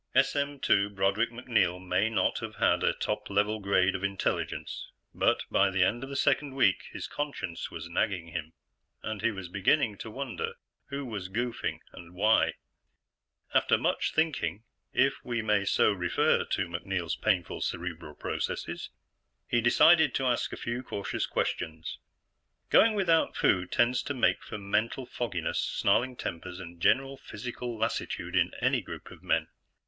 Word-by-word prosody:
SM/2 135 -8 +2
Broderick 100 +4 +2
MacNeil 115 -7 +1
may 95 +3 +1
not 115 - +1
have - - -6
had - - +3
a - - +4
top - - -3
level 105 +2 +1
grade 95 -2 +3
of 95 - -4
intelligence, 100 -1 -2 0.3
but - - +2
by - - +4
the 95 -1 +2
end 120 +7 +1
of 135 - -6
the 140 - -5
second 140 0 +1
week, 120 -8 +3
his - - -5
conscience 140 - -4
was 85 0 -7
nagging 85 -1 -1
him, 80 -1 -5 0.5
and 110 -2 -4
he 115 - +3
was 95 -5 -6
beginning 100 - +2
to 110 - -6
wonder 300 - -4 0.3
who 140 0 -4
was 100 -6 -5
goofing 120 +3 -2
and 85 +1 -12
why. 105 +4 +4 1.0
After - - +4
much - - 0
thinking 110 - 0 0.3
if - - +2
we 120 -2 -2
may 105 -2 +2
so 100 - +4
refer 90 -3 +2
to - - -1
MacNeil's 85 0 -2
painful 95 -6 0
cerebral 85 -3 -4
processes - - -3 0.6
he 120 - +2
decided 150 +5 +6
to 135 - 0
ask 125 -2 +1
a - - -5
few 120 +1 -3
cautious 100 -6 -3
questions. 80 0 -3 0.7
Going 225 -1 +6
without 170 -5 +2
food 90 -2 +2
tends 120 +1 +3
to 145 - -4
make 125 - +2
for - - -6
mental 105 +6 -1
fogginess, 115 -9 -2
snarling 125 +6 +1
tempers, 90 -3 -5
and 85 -2 -10
general 135 +5 +3
physical 120 -2 -6
lassitude 115 +1 -2
in - - +3
any - - +2
group - - -9
of - - -13
men. - - +1
105 Hz, 155 wpm, -29 LUFS, 90-125 Hz, 1.0 s, decided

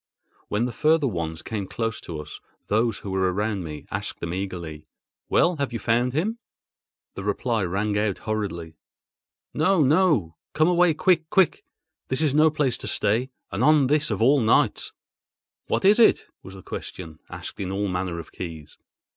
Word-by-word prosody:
When 105 +3 0
the 125 - -3
further 155 +3 +2
ones 80 -6 -4
came 105 -4 -4
close 115 +1 -3
to 80 -3 -6
us, 75 0 -9 0.3
those 110 +1 +2
who 100 - -7
were 95 -1 +1
around 105 0 -2
me 75 -2 -7
asked - - -4
them 85 0 -4
eagerly: 85 -5 -5 0.4
"Well, 175 -1 +3
have 140 -3 -2
you 120 - -3
found 120 +2 +1
him?" 210 - -1 0.7
The 100 - -7
reply 110 +3 -1
rang 100 +4 -1
out 105 -3 0
hurriedly: 100 -7 -4 0.8
"No! 160 +2 +3
no! 140 - +2 0.2
Come 155 +1 +3
away 175 -2 +4
quick—quick! 175 +1 +2 0.4
This 130 +4 0
is 145 -4 +2
no 155 +2 +5
place 145 -5 0
to - - -6
stay, 110 +5 +1 0.2
and 100 +7 -1
on 150 0 +5
this 150 +3 +2
of - - 0
all 140 +4 +5
nights!" 110 - +2 0.8
"What - - 0
was 205 +4 +5
it?" 230 - +5 0.2
was 95 - -11
the 95 - -12
question, 80 -4 -7
asked - - -8
in 95 -1 -3
all 100 +1 -1
manner 90 -2 -2
of 85 - -8
keys. 80 -4 -8
110 Hz, 170 wpm, -24 LUFS, 95-150 Hz, 0.8 s, no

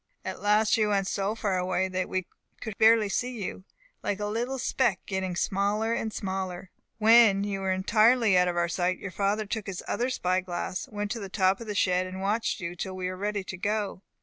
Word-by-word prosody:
At - - -5
last 210 +2 +3
you 215 -1 +2
went 200 -2 +1
so 200 +2 -1
far 200 -5 0
away 185 +1 0
that 185 0 -2
we 185 -1 -1 0.3
could 220 -2 -6
barely 220 -1 +6
see 245 +4 -2
you, 185 - -6 0.4
like 205 0 -2
a 205 - -2
little 235 +5 -2
speck, 245 -5 +1
getting 190 -2 -2
smaller 205 +5 0
and 225 -1 -2
smaller. 190 -3 -4 0.3
When 220 -3 +6
you 200 -1 -2
were 190 -1 -1
entirely 215 +3 +4
out 180 0 +4
of 175 -1 -1
our 170 0 +2
sight, 180 +2 0
your 195 - -7
father 205 +3 0
took 210 0 -4
his 190 -2 -5
other 245 +2 0
spy 185 -7 0
glass, 180 0 -4
went 205 +1 -3
on 200 -4 -6
top 190 +1 +2
of 230 - -8
the 210 - -3
shed, 185 -2 +2
and 185 +1 -7
watched 210 +5 0
you 170 -1 -5
till 185 +2 -5
we 185 -1 -3
were 185 - -5
ready 205 +1 -2
to 190 0 -7
go. 205 0 -2
195 Hz, 215 wpm, -27 LUFS, 185-215 Hz, 0.4 s, barely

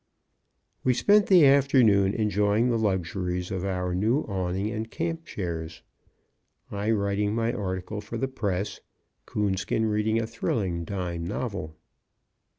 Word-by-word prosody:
We 125 -1 +3
spent 205 - +4
the 180 -6 +7
afternoon 130 -8 +4
enjoying 105 +2 +2
the 115 - +1
luxuries 90 -3 -1
of 95 -1 -3
our 90 -2 -1
new 110 +10 +2
awning 95 +1 -2
and 110 +1 -4
camp 165 +3 -3
chairs; 80 - -5 0.9
I 105 +1 -2
writing 105 -1 +1
my 115 0 0
article 95 +1 -4
for 110 +3 -6
the 135 - -1
press, 105 -7 -3 0.5
Coonskin 105 +2 0
reading 110 +1 +1
a 115 - -1
thrilling 95 -6 -2
dime 85 -3 -4
novel. 95 -7 -4
105 Hz, 130 wpm, -26 LUFS, 95-115 Hz, 0.9 s, the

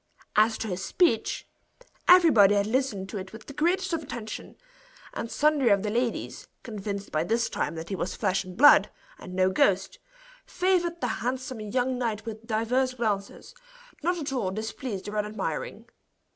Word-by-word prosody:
As 220 +1 +4
to 225 - -4
his 185 -1 -4
speech, 285 - +1 0.6
everybody 300 - +7
had 200 0 +2
listened 220 -4 -1
to 205 - -4
it 190 0 -8
with 220 - -11
the 280 - -9
greatest 340 +5 0
of 325 - 0
attention; 235 -7 -7 0.6
and 230 - -4
sundry 295 -3 +2
of 200 -1 +3
the 210 - -1
ladies, 240 +1 -2 0.2
convinced 200 -3 -5
by 155 0 +1
this 230 +5 0
time - - -2
that 160 +1 -7
he 195 - -2
was 185 - -3
flesh 190 -3 0
and 185 0 -11
blood, 290 +3 +7 0.3
and 180 -1 -9
no 185 0 +3
ghost, 190 0 +1 0.4
favored 350 -2 0
the 250 - 0
handsome 255 0 -3
young 250 +4 -1
knight 220 -3 -2
with 225 0 -8
divers 250 +3 0
glances, 210 - -3 0.5
not 350 +3 0
at 290 -4 -4
all 230 -8 0
displeased 215 +1 -5
or 210 +1 -2
unadmiring. 210 0 -4
220 Hz, 170 wpm, -27 LUFS, 200-260 Hz, 0.6 s, everybody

